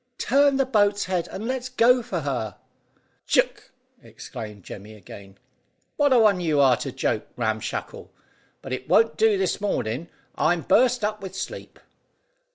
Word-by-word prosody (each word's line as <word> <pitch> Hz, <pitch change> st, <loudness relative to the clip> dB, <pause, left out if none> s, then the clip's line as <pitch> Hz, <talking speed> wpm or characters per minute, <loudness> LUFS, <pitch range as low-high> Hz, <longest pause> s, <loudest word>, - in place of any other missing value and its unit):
"Turn 280 Hz, +1 st, +3 dB
the 270 Hz, -, +2 dB
boat's 205 Hz, -5 st, +2 dB
head, 180 Hz, -2 st, -2 dB
and 215 Hz, +4 st, -6 dB
let's 255 Hz, 0 st, -3 dB
go 250 Hz, 0 st, +4 dB
for 195 Hz, -8 st, -4 dB
her." 125 Hz, -7 st, -3 dB, 0.7 s
"Ck!" -, -, +1 dB, 0.3 s
ejaculated 105 Hz, -3 st, -10 dB
Jemmy 105 Hz, +4 st, -10 dB
again. 100 Hz, -1 st, -13 dB, 0.6 s
"What 290 Hz, -1 st, +2 dB
a 255 Hz, -, +6 dB
one 210 Hz, -5 st, +4 dB
you 155 Hz, -4 st, +1 dB
are 135 Hz, -3 st, +5 dB
to -, -, -5 dB
joke, -, -, -2 dB
Ram 110 Hz, -2 st, -1 dB
Shackle; -, -, -6 dB, 0.5 s
but 130 Hz, -, -5 dB
it 130 Hz, 0 st, -6 dB
won't 225 Hz, 0 st, +4 dB
do 220 Hz, -2 st, +3 dB
this 190 Hz, +1 st, -1 dB
mornin'. 135 Hz, -, -2 dB, 0.2 s
I'm 165 Hz, +2 st, +1 dB
burst 250 Hz, -2 st, +3 dB
up 210 Hz, 0 st, -2 dB
with 190 Hz, -1 st, -8 dB
sleep." -, -, -7 dB
190 Hz, 160 wpm, -24 LUFS, -, 0.7 s, a